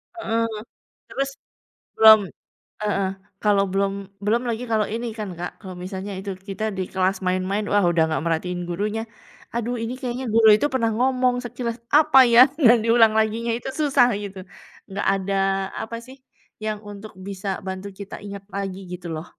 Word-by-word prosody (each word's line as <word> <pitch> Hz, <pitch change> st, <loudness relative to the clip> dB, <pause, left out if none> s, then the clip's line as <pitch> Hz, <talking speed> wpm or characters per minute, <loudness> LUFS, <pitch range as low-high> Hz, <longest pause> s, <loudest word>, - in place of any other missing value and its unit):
Heeh. 230 Hz, -9 st, -1 dB, 0.6 s
Terus, 275 Hz, 0 st, -2 dB, 0.7 s
belum 220 Hz, -1 st, +9 dB, 0.6 s
heeh, 200 Hz, -2 st, 0 dB, 0.3 s
kalau 205 Hz, -2 st, +3 dB
belum 195 Hz, 0 st, +1 dB, 0.3 s
belum 230 Hz, +4 st, +2 dB
lagi 235 Hz, +1 st, -2 dB
kalau 215 Hz, -2 st, +2 dB
ini 230 Hz, +2 st, -4 dB
kan 210 Hz, -, -3 dB
Kak. 175 Hz, +1 st, -6 dB
Kalau 190 Hz, -3 st, -8 dB
misalnya 190 Hz, +1 st, -5 dB
itu, 195 Hz, +1 st, -5 dB
kita 195 Hz, +2 st, -6 dB
di -, -, 0 dB
kelas 190 Hz, +1 st, +1 dB
main-main, 185 Hz, +3 st, 0 dB
wah 205 Hz, 0 st, +3 dB
udah 170 Hz, -1 st, +3 dB
nggak 155 Hz, -, -1 dB
merhatiin 175 Hz, +2 st, -1 dB
gurunya. 210 Hz, +5 st, -2 dB, 0.5 s
Aduh 235 Hz, +1 st, -2 dB
ini 230 Hz, +2 st, -3 dB
kayaknya 255 Hz, 0 st, -4 dB
guru 225 Hz, -1 st, +6 dB
itu 290 Hz, -, +1 dB
pernah 230 Hz, -3 st, +2 dB
ngomong 255 Hz, -1 st, +2 dB
sekilas 235 Hz, -1 st, -4 dB, 0.2 s
apa 305 Hz, -3 st, +5 dB
ya, 235 Hz, -, +8 dB, 0.3 s
dan 235 Hz, +2 st, +8 dB
diulang 230 Hz, -1 st, +5 dB
laginya 225 Hz, +2 st, 0 dB
itu 245 Hz, -, -6 dB
susah 275 Hz, -4 st, +4 dB
gitu. 200 Hz, -1 st, -7 dB, 0.5 s
Nggak 195 Hz, +1 st, -3 dB
ada 195 Hz, 0 st, -2 dB, 0.5 s
apa 230 Hz, +1 st, -5 dB
sih, 260 Hz, -, -12 dB, 0.5 s
yang 215 Hz, -1 st, -2 dB
untuk 205 Hz, +1 st, -10 dB
bisa 200 Hz, 0 st, -5 dB, 0.2 s
bantu 190 Hz, +1 st, -5 dB
kita 200 Hz, -, -7 dB
ingat 200 Hz, -1 st, -8 dB
lagi 195 Hz, -1 st, -3 dB
gitu 180 Hz, -1 st, -7 dB
loh. 155 Hz, +2 st, -5 dB
210 Hz, 165 wpm, -23 LUFS, 195-235 Hz, 0.7 s, belum